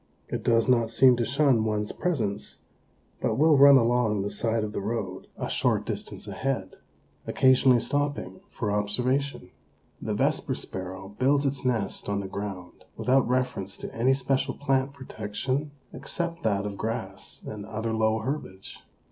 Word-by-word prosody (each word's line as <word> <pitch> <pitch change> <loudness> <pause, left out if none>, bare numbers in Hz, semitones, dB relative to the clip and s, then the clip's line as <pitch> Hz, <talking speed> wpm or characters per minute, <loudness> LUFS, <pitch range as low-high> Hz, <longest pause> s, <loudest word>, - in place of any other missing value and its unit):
It - - -3
does 115 -1 +3
not 120 -3 +3
seem 125 +2 +6
to 120 - 0
shun 135 -3 +3
one's 105 -1 -1
presence, 115 - -2 0.6
but - - +1
will 155 +2 +5
run 140 0 +9
along 115 -4 +2
the 100 - -3
side 110 +2 0
of 105 - -3
the - - -2
road, 100 -3 -4
a - - -3
short - - +1
distance - - -5
ahead, - - -3 0.5
occasionally 130 -1 +5
stopping 145 +6 -2
for 110 -4 -3
observation. 120 +2 -1 0.5
The - - -2
Vesper - - 0
Sparrow 95 +2 -6
builds 140 +2 +3
its 135 -2 -1
nest 115 -6 -1
on 100 0 0
the 100 - -4
ground 95 -3 -7
without 130 0 +3
reference 125 -7 -1
to - - -7
any 130 +4 +3
special 135 0 0
plant 135 -1 0
protection 130 +2 -3 0.2
except 170 -2 -4
that 100 -6 0
of 100 -1 -5
grass 110 -4 -4
and 105 -1 -6
other 110 +1 -3
low 110 0 +2
herbage. 110 -6 -5
115 Hz, 155 wpm, -27 LUFS, 105-135 Hz, 0.6 s, run